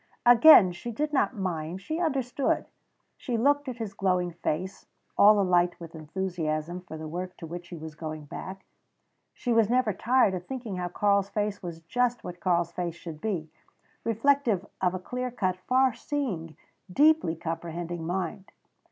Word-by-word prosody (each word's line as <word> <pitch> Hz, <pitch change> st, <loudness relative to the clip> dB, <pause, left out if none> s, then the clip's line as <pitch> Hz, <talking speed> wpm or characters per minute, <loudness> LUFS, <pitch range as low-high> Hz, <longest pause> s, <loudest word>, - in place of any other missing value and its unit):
Again 240 Hz, -, +9 dB
she 180 Hz, +7 st, -6 dB
did 300 Hz, +6 st, -2 dB
not 265 Hz, -, +2 dB
mind; 175 Hz, -2 st, -3 dB
she 315 Hz, -, -4 dB
understood. 275 Hz, -5 st, 0 dB, 0.5 s
She 245 Hz, -4 st, -2 dB
looked 285 Hz, +4 st, +2 dB
at 245 Hz, -, -6 dB
his 220 Hz, -4 st, -5 dB
glowing 180 Hz, -2 st, 0 dB
face, 175 Hz, +2 st, -4 dB, 0.3 s
all 210 Hz, +1 st, +7 dB
alight 180 Hz, -2 st, +2 dB
with 165 Hz, -1 st, -10 dB
enthusiasm 165 Hz, 0 st, -3 dB
for 170 Hz, -3 st, -9 dB
the 155 Hz, 0 st, -6 dB
work 180 Hz, +3 st, -5 dB
to 165 Hz, -, -8 dB
which 175 Hz, +2 st, -7 dB
he 175 Hz, -, -8 dB
was 160 Hz, 0 st, -8 dB
going 155 Hz, -1 st, -6 dB
back. 190 Hz, +6 st, -8 dB, 0.7 s
She 245 Hz, -, -1 dB
was 225 Hz, -2 st, +4 dB
never 245 Hz, -3 st, +2 dB
tired 240 Hz, 0 st, +3 dB
of 180 Hz, -1 st, -5 dB
thinking 240 Hz, -7 st, -5 dB
how 180 Hz, 0 st, -2 dB
Karl's 200 Hz, +2 st, +1 dB
face 205 Hz, -1 st, -2 dB
was 170 Hz, -2 st, -7 dB
just 245 Hz, +7 st, 0 dB
what 180 Hz, 0 st, -7 dB
Karl's 175 Hz, -2 st, +1 dB
face 175 Hz, -2 st, -3 dB
should 165 Hz, -3 st, -9 dB
be 175 Hz, -8 st, -3 dB, 0.5 s
reflective 230 Hz, -3 st, +2 dB, 0.2 s
of 185 Hz, -1 st, +1 dB
a -, -, -3 dB
clear 250 Hz, +6 st, -4 dB
cut, 185 Hz, -7 st, -1 dB
far 260 Hz, 0 st, +4 dB
seeing, 225 Hz, -, -4 dB, 0.3 s
deeply 300 Hz, -, +4 dB
comprehending 170 Hz, +1 st, -5 dB
mind. 185 Hz, +3 st, -4 dB
185 Hz, 165 wpm, -27 LUFS, 170-240 Hz, 0.7 s, Again